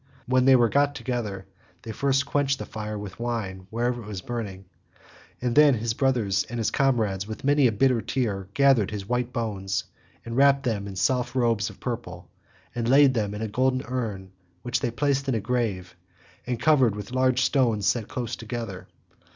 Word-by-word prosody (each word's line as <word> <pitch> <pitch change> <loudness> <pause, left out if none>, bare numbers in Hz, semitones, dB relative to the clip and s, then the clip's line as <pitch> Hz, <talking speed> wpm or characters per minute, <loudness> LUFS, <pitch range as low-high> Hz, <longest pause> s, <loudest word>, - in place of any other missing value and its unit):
When 130 0 +2
they 135 0 +7
were 120 -2 +5
got 145 +4 +2
together, 115 -7 -4 0.4
they 115 - -6
first 135 +3 +1
quenched 140 -1 0
the - - -6
fire 105 0 -5
with 100 -1 -8
wine 105 -6 -4
wherever 120 +2 -1
it 105 - -11
was 100 -3 -6
burning, 105 -6 -5 0.7
and 120 -1 -1
then 150 -2 +7
his 115 0 -2
brothers 115 -7 +1
and 120 - -4
comrades 110 -8 +1
with 110 - -7
many 140 -1 +4
a - - +1
bitter 120 +2 +2
tear 105 -4 -2
gathered 135 -7 +4
his 100 -2 -6
white 125 +1 -1
bones, 95 -6 -2 0.4
wrapped 140 +4 +3
them 105 -6 -2
in 100 - -7
soft 120 +7 0
robes 115 -5 +1
of - - -14
purple, 110 -8 -6 0.4
and 120 -1 -2
laid 135 0 +6
them 105 -4 -1
in 105 - -4
a - - -1
golden 130 +4 0
urn, 105 -7 -4 0.3
which 120 0 -1
they 125 - -1
placed 140 +2 0
in 130 - +1
a - - +1
grave 105 -5 -2 0.5
and 125 -2 -2
covered 130 -5 +4
over - - -8
with 105 +2 -7
large 130 0 +2
stones 115 -8 +2
set 115 -1 +1
close 120 -2 -4
together. 115 -4 -6
120 Hz, 185 wpm, -25 LUFS, 105-130 Hz, 0.7 s, they